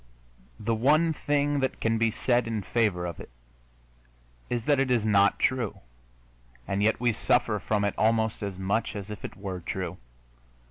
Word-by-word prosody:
The 115 +2 -1
one 150 +8 +3
thing 145 -1 0
that 130 -1 -1
can 115 0 +1
be 115 0 +3
said 120 +2 +1
in 110 -3 -2
favor 100 -5 0
of 85 - -5
it - - -10 1.2
is 120 -2 -2
that 145 -2 +3
it 135 -1 +1
is 120 -4 +2
not 100 -2 +4
true, 125 -5 0 0.9
and 100 +1 -1
yet 110 +2 +2
we 120 -1 +2
suffer 110 -1 +1
from 105 0 0
it 100 - 0
almost 110 0 +2
as 100 -3 -4
much 100 +5 -1
as 100 0 -6
if 105 - -8
it - - -7
were 95 -2 -5
true. 90 0 -4
110 Hz, 175 wpm, -27 LUFS, 100-125 Hz, 1.2 s, not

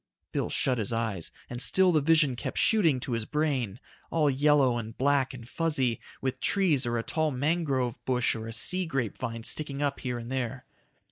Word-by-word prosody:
Bill - - -1
shut 130 -3 0
his 105 - -1
eyes, 110 -7 -2 0.2
and 120 0 -5
still 185 +4 +4
the 155 -3 +3
vision 155 -3 +4
kept - - -5
shooting 170 - +4
to 125 - -5
his 115 -2 -1
brain. 135 -8 -1 0.3
All 155 -3 +2
yellow 135 -2 +3
and 110 0 -7
black 140 0 +2
and 120 -3 -10
fuzzy, 135 -7 0 0.2
with 130 -1 -2
trees 170 -11 +2
or 120 0 0
a 115 - -1
tall 155 +4 0
mangrove 140 -3 0
bush 125 -2 +1
or 110 0 -6
a - - -5
sea 180 +10 0
grape 135 - -2
vine 115 -2 -4
sticking 145 +2 -3
up 140 -1 -1
here 125 -2 -3
and 120 +1 -7
there. 130 -1 -3
130 Hz, 195 wpm, -28 LUFS, 120-150 Hz, 0.3 s, still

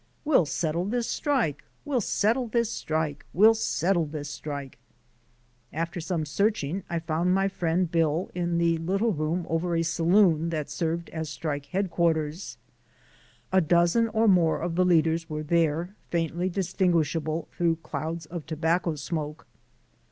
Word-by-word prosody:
"We'll 275 - +4
settle 165 +3 -1
this 235 +3 -1
strike: 250 - 0 0.2
we'll 275 -5 0
settle 230 +5 +1
this 235 0 0
strike: 155 -2 -2
we'll 215 +5 +7
settle 185 -6 0
this 145 -1 -6
strike." 140 -3 -6 0.9
After 165 +2 -3
some 165 -2 -2
searching 190 +1 0
I 170 - -1
found 165 +2 0
my 195 0 +2
friend 175 -2 0
Bill 165 +1 +1
in 175 -1 -1
the 170 -1 +2
little 195 +7 0
room 160 +2 -1
over 170 +1 0
a 165 - +1
saloon 170 0 +3
that 155 -3 -3
served 170 0 -2
as 160 -1 -4
strike 145 -2 -4
headquarters. 170 -3 -1 1.0
A 190 - +5
dozen 175 +7 +3
or 225 0 +1
more 175 -5 +4
of 170 0 -2
the 180 +2 +2
leaders 165 -1 +2
were 155 0 -3
there, 170 +3 0
faintly 170 +2 -1
distinguishable 170 -4 0
through 170 -1 +1
clouds 160 +1 -4
of 165 0 -7
tobacco 160 +1 0
smoke. 150 0 -4
170 Hz, 145 wpm, -27 LUFS, 160-185 Hz, 1.0 s, we'll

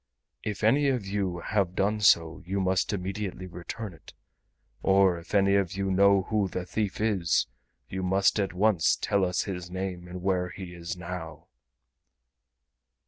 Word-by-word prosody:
If 105 -2 -4
any 140 +7 +4
of 125 -7 0
you 95 -3 -2
have 95 -3 0
done 105 +2 +1
so 85 -5 +4
you 95 +3 -2
must 95 0 +1
immediately 95 -1 -4
return 90 +3 -7
it, 80 - -15 0.7
or 95 -2 +4
if 85 +5 -7
any 100 0 +4
of 100 -3 +2
you 95 0 -1
know 100 0 +5
who 105 0 0
the 90 -1 -4
thief 100 +1 -2
is 100 -7 +2 0.4
you 95 - -4
must 95 +3 +2
at 100 -2 0
once 95 -4 +3
tell 100 -1 0
us 90 0 +1
his 90 -3 -5
name 90 -1 -4
and 90 0 -8
where 90 -2 +1
he 90 -1 -8
is 85 +1 -6
now." 85 -3 -7
95 Hz, 160 wpm, -28 LUFS, 90-100 Hz, 0.7 s, know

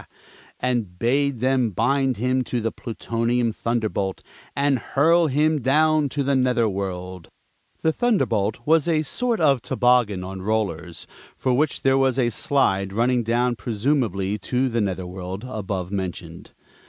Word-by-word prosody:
and 120 -8 -2
bade 135 +3 0
them 130 -2 +2
bind 130 +5 +1
him 130 +3 +1
to 125 - -2
the 115 0 -2
Plutonian 115 0 -2
Thunderbolt 110 -5 -2 0.3
and 140 -2 +2
hurl 165 +7 +3
him 150 +2 +1
down 150 +3 +3
to 140 +2 -2
the 140 +1 +1
nether 125 -3 +2
world. 95 -3 -5 0.6
The 160 - +2
thunderbolt 120 - 0
was 160 0 +3
a 155 -2 +2
sort 240 - -1
of 140 -6 +3
toboggan 120 -8 +2
on 95 0 -7
rollers, 95 -5 -2 0.3
for 130 - 0
which 145 +4 0
there 135 0 +3
was 135 -1 +2
a 120 -3 +2
slide 100 -8 0
running 120 +3 +2
down 120 +2 +1
presumably 105 -3 -1
to 130 +3 0
the 115 -1 0
nether 95 -2 -2
world, 95 +4 -6
above 95 -6 -4
mentioned. 90 -4 -6
120 Hz, 145 wpm, -23 LUFS, 100-135 Hz, 0.6 s, hurl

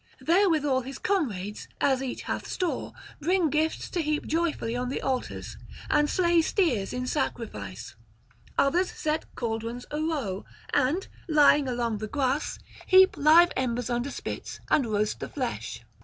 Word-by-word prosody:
Therewithal 315 -7 +3
his 265 +2 -7
comrades, 215 - -2
as 265 -2 +2
each 260 -2 -4
hath - - -3
store, 360 -3 -2 0.3
bring 340 0 +2
gifts 310 +2 0
to 350 - 0
heap 305 -1 -1
joyfully 320 -8 -1
on 250 0 -2
the 270 - -2
altars, 260 -2 -3 0.3
and 295 0 +3
slay 345 -2 +3
steers 315 - +1
in 250 0 -3
sacrifice: 115 - -3 0.6
others 345 +7 +3
set 310 +1 -2
cauldrons 230 +1 -3
arow, 295 - -2 0.3
and, 310 +10 +2 0.2
lying 295 -2 +5
along 235 -3 -1
the 215 - -4
grass, 275 +3 -1 0.3
heap 375 0 +7
live 320 +4 +6
embers 245 -1 -1
under 240 +3 -1
spits - - -6
and 290 -6 +3
roast 210 -1 0
the - - -5
flesh. - - -4
275 Hz, 140 wpm, -27 LUFS, 240-320 Hz, 0.6 s, heap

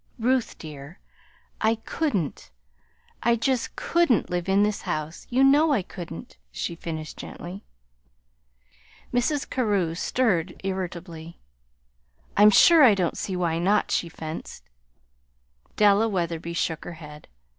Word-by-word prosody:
"Ruth, 250 +1 0
dear, 150 +1 -10 0.6
I 220 +1 +3
couldn't 225 - -3 0.7
I 235 0 +3
just 250 +1 -1
couldn't 335 - +1
live 180 +1 -2
in 195 +1 +4
this 210 -1 0
house. 155 +2 -4
You 255 +2 +3
know 290 +3 +5
I 205 - +1
couldn't," 170 - -9
she 65 - -4
finished 160 -2 -6
gently. 185 +4 -8 1.5
Mrs. 260 +4 0
Carew 205 -9 0
stirred 180 -2 0
irritably. 175 -3 -5 1.0
"I'm 210 +1 +7
sure 325 - +7
I 225 -6 +7
don't 180 -3 -1
see 190 - -3
why 170 -2 0
not," 200 +4 +2
she 170 - 0
fenced. 160 0 -8 1.1
Della 210 +1 +4
Wetherby 170 -3 -2
shook 165 -1 -2
her 175 - -7
head. 150 -2 -12
190 Hz, 125 wpm, -25 LUFS, 165-230 Hz, 1.5 s, I'm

